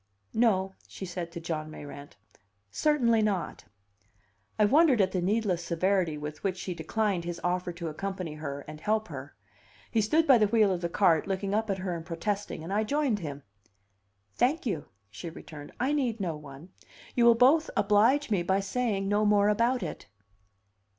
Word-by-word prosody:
"No," 195 Hz, -5 st, +2 dB
she 190 Hz, -, -7 dB
said 175 Hz, -2 st, -5 dB
to 170 Hz, -, -6 dB
John 160 Hz, -2 st, -4 dB
Mayrant, 145 Hz, -1 st, -10 dB, 0.5 s
"certainly 240 Hz, -, +2 dB
not." 205 Hz, -5 st, -2 dB, 0.9 s
I 210 Hz, -, +5 dB
wondered 280 Hz, +1 st, +5 dB
at 190 Hz, -2 st, +3 dB
the 185 Hz, -, -1 dB
needless 190 Hz, -2 st, 0 dB
severity 175 Hz, -1 st, 0 dB
with 150 Hz, +1 st, -7 dB
which 190 Hz, -2 st, -1 dB
she 180 Hz, 0 st, -4 dB
declined 180 Hz, +3 st, -1 dB
his 170 Hz, 0 st, -5 dB
offer 180 Hz, 0 st, -1 dB
to 170 Hz, -1 st, -6 dB
accompany 185 Hz, 0 st, -4 dB
her 145 Hz, -2 st, -5 dB
and 150 Hz, -, -9 dB
help 220 Hz, -1 st, 0 dB
her. 140 Hz, -2 st, -8 dB, 0.6 s
He 225 Hz, -, +2 dB
stood 310 Hz, +10 st, +2 dB
by 265 Hz, -6 st, +6 dB
the 210 Hz, -, +4 dB
wheel 215 Hz, -2 st, +3 dB
of 175 Hz, -, -3 dB
the 170 Hz, -, -1 dB
cart, 170 Hz, -3 st, +3 dB
looking 195 Hz, 0 st, -2 dB
up 220 Hz, +1 st, 0 dB
at 195 Hz, -, 0 dB
her 185 Hz, -2 st, -3 dB
and 165 Hz, -, -6 dB
protesting, 185 Hz, +1 st, -3 dB
and 180 Hz, +4 st, -5 dB
I 215 Hz, +2 st, +2 dB
joined 275 Hz, -2 st, 0 dB
him. 145 Hz, -5 st, -6 dB, 0.9 s
"Thank 270 Hz, -, +1 dB
you," 180 Hz, -11 st, -2 dB, 0.3 s
she 135 Hz, +11 st, -7 dB
returned, 155 Hz, -2 st, -10 dB
"I 260 Hz, +4 st, +1 dB
need 250 Hz, -6 st, 0 dB
no 175 Hz, -5 st, -2 dB
one. 150 Hz, +3 st, -11 dB, 0.4 s
You 240 Hz, -, +3 dB
will 235 Hz, -1 st, +7 dB
both 280 Hz, +7 st, +4 dB
oblige 220 Hz, +7 st, +3 dB
me 195 Hz, -4 st, +2 dB
by 190 Hz, +3 st, +1 dB
saying 200 Hz, -1 st, -1 dB
no 205 Hz, +1 st, +2 dB
more 205 Hz, -1 st, +4 dB
about 235 Hz, +4 st, +2 dB
it." -, -, -6 dB
195 Hz, 180 wpm, -28 LUFS, 170-220 Hz, 0.9 s, will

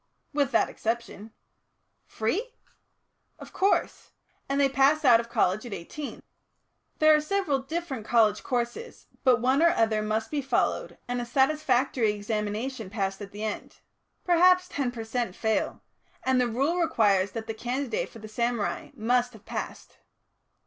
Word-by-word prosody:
"With 285 Hz, -3 st, +1 dB
that -, -, +3 dB
exception." 225 Hz, -2 st, -4 dB, 0.8 s
"Free?" 405 Hz, -, -2 dB, 0.8 s
"Of -, -, -12 dB
course. 390 Hz, +1 st, 0 dB, 0.4 s
And 275 Hz, +1 st, 0 dB
they 280 Hz, -, +5 dB
pass 275 Hz, +3 st, +3 dB
out 240 Hz, -3 st, +7 dB
of 235 Hz, 0 st, -5 dB
college 215 Hz, -4 st, +1 dB
at 240 Hz, -4 st, -7 dB
eighteen. 280 Hz, -, -7 dB, 0.7 s
There 310 Hz, 0 st, +6 dB
are 305 Hz, -, +2 dB
several 305 Hz, -4 st, 0 dB
different 275 Hz, -3 st, -4 dB
college 215 Hz, -2 st, +3 dB
courses, 245 Hz, -, -3 dB, 0.2 s
but 255 Hz, -4 st, +5 dB
one 260 Hz, +4 st, +3 dB
or 340 Hz, -, +6 dB
other 220 Hz, -9 st, +2 dB
must 215 Hz, +1 st, -2 dB
be 295 Hz, -2 st, 0 dB
followed 260 Hz, -2 st, -1 dB
and 245 Hz, 0 st, -2 dB
a -, -, -4 dB
satisfactory 260 Hz, -4 st, +2 dB
examination 210 Hz, +2 st, -3 dB
passed 195 Hz, -2 st, -3 dB
at 200 Hz, -1 st, -8 dB
the 210 Hz, +1 st, -7 dB
end 215 Hz, -1 st, -4 dB, 0.5 s
perhaps 365 Hz, +1 st, +5 dB
ten 275 Hz, -7 st, -2 dB
per 240 Hz, -2 st, -6 dB
cent. 225 Hz, -3 st, -3 dB
fail 220 Hz, -1 st, -1 dB, 0.4 s
and 260 Hz, -1 st, +2 dB
the 245 Hz, -, +2 dB
Rule 275 Hz, +10 st, 0 dB
requires 200 Hz, -, +2 dB
that 225 Hz, -1 st, -5 dB
the 225 Hz, -, -4 dB
candidate 270 Hz, -, -2 dB
for -, -, -13 dB
the 215 Hz, -1 st, -9 dB
samurai 235 Hz, 0 st, -2 dB
must 245 Hz, +2 st, +1 dB
have 220 Hz, -2 st, -15 dB
passed." -, -, -6 dB
245 Hz, 155 wpm, -27 LUFS, 220-280 Hz, 0.8 s, out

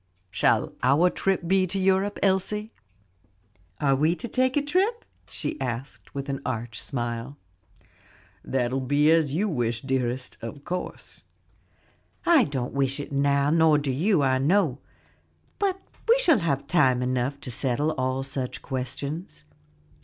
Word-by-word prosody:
Shall -, -, +1 dB
our 175 Hz, +6 st, +4 dB
trip 190 Hz, -3 st, -1 dB
be 190 Hz, +1 st, +3 dB
to 195 Hz, -, -2 dB
Europe, 190 Hz, +1 st, +1 dB
Elsie?" 205 Hz, +3 st, +1 dB, 1.1 s
"Are 140 Hz, -2 st, +3 dB
we 155 Hz, +5 st, +2 dB
to 240 Hz, -, -6 dB
take 255 Hz, +2 st, +1 dB
a -, -, +3 dB
trip?" 390 Hz, +10 st, 0 dB, 0.2 s
she 150 Hz, -, -4 dB
asked 130 Hz, +2 st, -5 dB
with 140 Hz, 0 st, -4 dB
an 140 Hz, 0 st, -3 dB
arch 115 Hz, -1 st, -4 dB
smile. 120 Hz, +2 st, -4 dB, 1.1 s
"That 125 Hz, -2 st, -1 dB
will 135 Hz, -, 0 dB
be 145 Hz, +4 st, +3 dB
as 155 Hz, -4 st, +2 dB
you 205 Hz, +6 st, +1 dB
wish, 120 Hz, -, -1 dB
dearest, 130 Hz, -1 st, -2 dB
of 125 Hz, +5 st, -8 dB
course." 180 Hz, 0 st, -6 dB, 1.0 s
"I 335 Hz, -6 st, +6 dB
don't 130 Hz, -4 st, -3 dB
wish 135 Hz, 0 st, 0 dB
it 145 Hz, -, -6 dB
now, 140 Hz, +1 st, +2 dB
nor 160 Hz, -2 st, +5 dB
do 145 Hz, -2 st, -1 dB
you, 165 Hz, +4 st, +2 dB
I 130 Hz, -1 st, +2 dB
know; 150 Hz, -2 st, +2 dB, 0.8 s
but 385 Hz, -2 st, 0 dB, 0.3 s
we 475 Hz, -, +7 dB
shall 345 Hz, -, +4 dB
have 140 Hz, -5 st, -1 dB
time 135 Hz, -5 st, +3 dB
enough 130 Hz, +2 st, -1 dB
to 125 Hz, -, -6 dB
settle 135 Hz, +5 st, +1 dB
all 130 Hz, -2 st, -1 dB
such 135 Hz, -2 st, -4 dB
questions." 140 Hz, -, -5 dB
140 Hz, 145 wpm, -26 LUFS, 130-185 Hz, 1.1 s, we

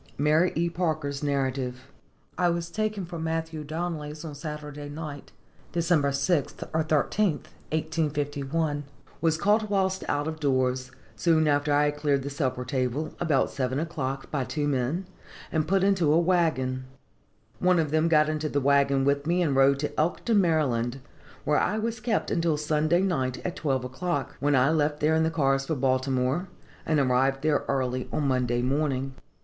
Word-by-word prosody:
Mary 155 Hz, +5 st, +3 dB
E. 170 Hz, +2 st, +1 dB
Parker's 155 Hz, -5 st, -2 dB
Narrative. 130 Hz, -2 st, -2 dB, 0.4 s
"I 175 Hz, -1 st, +2 dB
was 170 Hz, 0 st, -2 dB
taken 215 Hz, -2 st, -2 dB
from 170 Hz, -1 st, -6 dB
Matthew 160 Hz, -1 st, -3 dB
Donnelly's 155 Hz, -1 st, -4 dB
on 155 Hz, -, -6 dB
Saturday 150 Hz, 0 st, -7 dB
night 145 Hz, -1 st, -7 dB, 0.4 s
(Dec. 170 Hz, -2 st, +2 dB
6th, 140 Hz, +2 st, 0 dB
or 160 Hz, 0 st, +2 dB
13th, 155 Hz, +4 st, 0 dB, 0.2 s
1851); 150 Hz, -1 st, -1 dB, 0.4 s
was 160 Hz, -1 st, +2 dB
caught 210 Hz, +3 st, +2 dB
whilst 190 Hz, -1 st, 0 dB
out 145 Hz, +1 st, 0 dB
of 160 Hz, 0 st, -4 dB
doors, 130 Hz, -3 st, 0 dB, 0.3 s
soon 160 Hz, -2 st, +3 dB
after 145 Hz, 0 st, +2 dB
I 145 Hz, +1 st, +4 dB
had 145 Hz, -, -12 dB
cleared 145 Hz, -2 st, +1 dB
the 140 Hz, -, -4 dB
supper 130 Hz, -3 st, -2 dB
table, 130 Hz, +3 st, -2 dB
about 155 Hz, -6 st, +1 dB
seven 130 Hz, 0 st, -1 dB
o'clock, 140 Hz, -5 st, -4 dB
by 140 Hz, -3 st, 0 dB
two 145 Hz, +3 st, -2 dB
men, 140 Hz, +7 st, -1 dB, 0.5 s
and 155 Hz, -1 st, 0 dB
put 190 Hz, +2 st, +2 dB
into 190 Hz, -6 st, +3 dB
a 155 Hz, -, +5 dB
wagon. 155 Hz, -8 st, +1 dB, 0.7 s
One 180 Hz, 0 st, +3 dB
of 155 Hz, -3 st, 0 dB
them 155 Hz, +1 st, +3 dB
got 155 Hz, -2 st, +4 dB
into 155 Hz, 0 st, -1 dB
the 145 Hz, -, 0 dB
wagon 140 Hz, 0 st, +3 dB
with 140 Hz, +1 st, +1 dB
me, 175 Hz, +1 st, +2 dB
and 145 Hz, -5 st, +1 dB
rode 135 Hz, +1 st, +5 dB
to 150 Hz, -, -3 dB
Elkton, 200 Hz, +7 st, +2 dB
Md., 135 Hz, -9 st, +1 dB, 0.5 s
where 150 Hz, -, +3 dB
I 210 Hz, -, 0 dB
was 230 Hz, +1 st, -2 dB
kept 220 Hz, -1 st, -1 dB
until 165 Hz, -2 st, +1 dB
Sunday 155 Hz, +4 st, +1 dB
night 130 Hz, -9 st, 0 dB
at 180 Hz, -, -2 dB
twelve 135 Hz, -7 st, -1 dB
o'clock, 145 Hz, +2 st, -3 dB
when 145 Hz, 0 st, +2 dB
I 130 Hz, +3 st, +4 dB
left 150 Hz, -1 st, +1 dB
there 155 Hz, +1 st, +2 dB
in 160 Hz, -, +3 dB
the 160 Hz, -, +2 dB
cars 135 Hz, -4 st, +1 dB
for 160 Hz, -, 0 dB
Baltimore, 130 Hz, +4 st, 0 dB, 0.4 s
and 155 Hz, -2 st, +3 dB
arrived 135 Hz, +1 st, +2 dB
there 155 Hz, -1 st, +2 dB
early 130 Hz, -2 st, -1 dB
on 145 Hz, -, 0 dB
Monday 125 Hz, -2 st, +1 dB
morning. 135 Hz, 0 st, 0 dB
150 Hz, 170 wpm, -27 LUFS, 135-165 Hz, 0.7 s, a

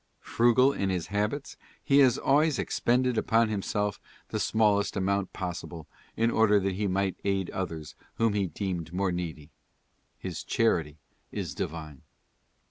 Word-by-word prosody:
Frugal 125 Hz, +3 st, +3 dB
in 100 Hz, -, -1 dB
his 90 Hz, -3 st, -1 dB
habits, 105 Hz, +8 st, -2 dB, 0.3 s
he 140 Hz, 0 st, +4 dB
has 130 Hz, -3 st, +5 dB
always 145 Hz, +1 st, +3 dB
expended 125 Hz, 0 st, +1 dB
upon 115 Hz, 0 st, +2 dB
himself 105 Hz, 0 st, -2 dB, 0.3 s
the -, -, -2 dB
smallest 105 Hz, -2 st, +2 dB
amount 100 Hz, 0 st, 0 dB
possible, 85 Hz, -3 st, -6 dB, 0.3 s
in 115 Hz, +1 st, +2 dB
order 105 Hz, -2 st, +4 dB
that 95 Hz, 0 st, -1 dB
he 100 Hz, +2 st, -1 dB
might 95 Hz, 0 st, -1 dB
aid 95 Hz, -2 st, 0 dB
others 80 Hz, -5 st, -5 dB, 0.2 s
whom 115 Hz, -2 st, +2 dB
he 100 Hz, -2 st, 0 dB
deemed 90 Hz, -3 st, -4 dB
more 95 Hz, +1 st, 0 dB
needy. 80 Hz, -4 st, -5 dB, 0.7 s
His -, -, -6 dB
charity 80 Hz, -10 st, +1 dB, 0.3 s
is -, -, -4 dB
divine. 75 Hz, -3 st, -6 dB
100 Hz, 140 wpm, -28 LUFS, 90-115 Hz, 0.7 s, has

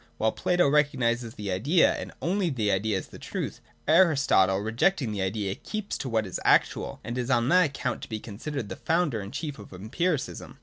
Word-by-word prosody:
While 110 Hz, 0 st, +2 dB
Plato 180 Hz, -3 st, +2 dB
recognises 130 Hz, -6 st, +1 dB
the 105 Hz, -2 st, -4 dB
idea 140 Hz, -, +3 dB
and -, -, -6 dB
only 185 Hz, +1 st, +1 dB
the 110 Hz, -8 st, 0 dB
idea 100 Hz, +1 st, +1 dB
as -, -, -6 dB
the -, -, -12 dB
truth, -, -, -5 dB, 0.3 s
Aristotle, 145 Hz, -, +4 dB
rejecting 115 Hz, -, +1 dB
the 100 Hz, -2 st, -3 dB
idea, 95 Hz, 0 st, -1 dB
keeps 215 Hz, -, -5 dB
to 130 Hz, -, -4 dB
what 110 Hz, -2 st, +1 dB
is 95 Hz, -, -4 dB
actual, -, -, +2 dB
and 120 Hz, +3 st, -4 dB
is 125 Hz, +1 st, -3 dB
on 120 Hz, -1 st, +2 dB
that 180 Hz, 0 st, +6 dB
account 140 Hz, -3 st, -3 dB
to -, -, -8 dB
be 110 Hz, -2 st, -3 dB
considered 120 Hz, +4 st, -5 dB
the -, -, -5 dB
founder 160 Hz, -8 st, 0 dB
and 100 Hz, +1 st, -8 dB
chief 145 Hz, -1 st, -5 dB
of 105 Hz, -, -12 dB
empiricism. 135 Hz, -, -3 dB
120 Hz, 200 wpm, -27 LUFS, 105-155 Hz, 0.3 s, that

